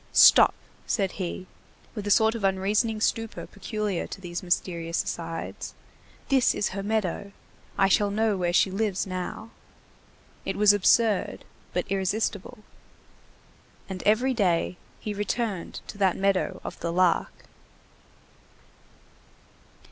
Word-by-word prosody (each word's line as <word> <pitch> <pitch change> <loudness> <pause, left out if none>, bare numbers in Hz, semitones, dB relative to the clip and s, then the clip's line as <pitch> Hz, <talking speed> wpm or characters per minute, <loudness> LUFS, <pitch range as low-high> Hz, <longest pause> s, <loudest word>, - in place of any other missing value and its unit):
—"Stop," - - +7 0.3
said 195 -4 0
he 185 +1 -4 0.5
with 210 -3 -5
a - - 0
sort 220 +2 +4
of 230 -3 -6
unreasoning 205 +4 +1
stupor 225 0 -1
peculiar 205 -2 -3
to - - -8
these 175 -2 -5
mysterious 170 -2 -1
asides, 165 -1 -5 0.5
"this 265 -3 +3
is 205 - 0
her 195 +1 -4
meadow. 200 -2 -2 0.5
I 195 - +4
shall 205 +1 +3
know 215 +1 +1
where 175 -2 0
she 185 +2 +3
lives 200 -1 -1
now." 185 +4 -5 0.9
It - - -3
was 205 0 +6
absurd, 205 +1 +2 0.3
but 180 - -1
irresistible. 195 +1 -2 1.2
And 190 -2 -6
every 245 +5 +3
day 180 -5 +1 0.2
he 210 - -4
returned 205 -2 -3
to 205 - -10
that 190 -3 +2
meadow 190 -1 0
of - - -7
the 170 - -2
Lark. 180 0 +1
200 Hz, 125 wpm, -26 LUFS, 185-215 Hz, 1.2 s, Stop